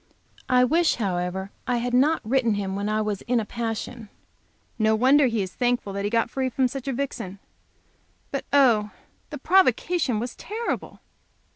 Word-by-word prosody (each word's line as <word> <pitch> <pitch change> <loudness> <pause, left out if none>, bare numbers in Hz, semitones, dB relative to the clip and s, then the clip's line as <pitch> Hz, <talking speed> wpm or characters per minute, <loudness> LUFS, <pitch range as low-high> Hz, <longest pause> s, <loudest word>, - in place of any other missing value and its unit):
I 250 0 +5
wish, 325 +6 +3
however, 190 -2 -2 0.2
I 250 -1 +1
had 245 +1 -2
not 290 +6 +3
written 235 -3 +2
him 195 -1 -3
when 200 +1 -2
I 215 0 0
was 210 -2 -3
in 235 -3 +1
passion. 225 0 -5 0.7
No 220 0 +3
wonder 265 +5 +5
he 225 -4 0
is 185 - -7
thankful 245 -5 -1
that 200 0 -3
he 230 -1 +2
free 260 +2 -2
from 255 +1 +1
such 270 +1 -7
a - - 0
vixen. 235 -8 -4 0.9
But, 275 - -3
oh 235 -7 +4 0.4
the 295 - -6
provocation 320 - +2
was 240 +2 -5
terrible! 450 +3 -5
240 Hz, 160 wpm, -25 LUFS, 210-265 Hz, 0.9 s, I